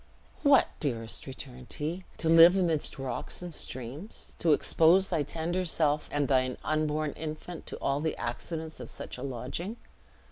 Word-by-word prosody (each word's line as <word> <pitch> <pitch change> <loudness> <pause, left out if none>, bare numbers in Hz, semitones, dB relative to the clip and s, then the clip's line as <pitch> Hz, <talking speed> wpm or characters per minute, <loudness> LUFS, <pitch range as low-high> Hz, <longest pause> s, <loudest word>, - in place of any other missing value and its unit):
"What, 280 -2 +6
dearest!" 115 -6 -2
returned 130 -1 -9
he, 170 +5 -3
"to 165 - -2
live 165 +2 +9
amidst 165 -5 0
rocks 135 +6 -4
and 175 -2 -5
streams! 135 - -6
to 165 - +3
expose 165 +5 +5
thy 165 -4 +1
tender 165 +5 -1
self, 150 -3 +1
and 145 -1 +1
thine 130 -1 +2
unborn 155 -1 0
infant, 160 +2 -7
to - - -6
all 140 +1 0
the 160 0 -1
accidents 160 +7 -4
of - - -7
such - - -7
a - - -7
lodging!" 140 - -4
155 Hz, 155 wpm, -29 LUFS, 135-170 Hz, -, live